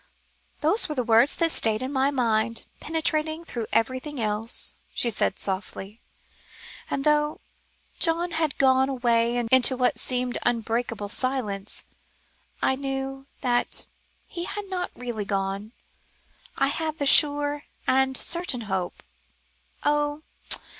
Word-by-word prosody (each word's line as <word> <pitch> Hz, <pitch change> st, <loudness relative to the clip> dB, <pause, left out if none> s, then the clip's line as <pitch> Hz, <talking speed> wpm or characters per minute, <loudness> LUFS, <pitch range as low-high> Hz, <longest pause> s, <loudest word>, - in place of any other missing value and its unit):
"Those 325 Hz, +8 st, +4 dB
were 300 Hz, -, -3 dB
the 250 Hz, -, 0 dB
words 230 Hz, +4 st, +4 dB
that 330 Hz, -1 st, +2 dB
stayed 220 Hz, -2 st, +2 dB
in 265 Hz, +2 st, -4 dB
my 265 Hz, 0 st, +2 dB
mind, 230 Hz, -4 st, 0 dB
penetrating 315 Hz, 0 st, -1 dB
through 230 Hz, -7 st, -5 dB
everything 255 Hz, +5 st, -1 dB
else," 215 Hz, +1 st, -2 dB, 0.2 s
she 235 Hz, -, +1 dB
said 195 Hz, -, 0 dB
softly, 195 Hz, +2 st, -4 dB, 0.9 s
"and 275 Hz, -, -2 dB
though 300 Hz, 0 st, +2 dB, 0.6 s
John 340 Hz, +1 st, +3 dB
had 320 Hz, -4 st, -1 dB
gone 265 Hz, 0 st, +4 dB
away 240 Hz, -2 st, +1 dB
into 260 Hz, 0 st, +5 dB
what 250 Hz, -1 st, +1 dB
seemed 250 Hz, -1 st, 0 dB
unbreakable 230 Hz, -2 st, -1 dB
silence, 215 Hz, -5 st, -2 dB, 0.8 s
I 265 Hz, -, +3 dB
knew 270 Hz, 0 st, -4 dB
that 245 Hz, -2 st, 0 dB, 0.4 s
he 345 Hz, -1 st, -5 dB
had 415 Hz, +2 st, -5 dB
not 360 Hz, -1 st, -2 dB
really 240 Hz, -4 st, -4 dB
gone. 195 Hz, +1 st, -2 dB, 0.9 s
I 275 Hz, -, +3 dB
had 315 Hz, +1 st, -2 dB
the 285 Hz, -, -1 dB
sure 290 Hz, +1 st, +4 dB, 0.2 s
and 265 Hz, 0 st, +3 dB
certain 335 Hz, -8 st, +2 dB
hope 190 Hz, -4 st, -3 dB, 0.8 s
oh! 295 Hz, +1 st, 0 dB
260 Hz, 125 wpm, -25 LUFS, 230-295 Hz, 0.9 s, into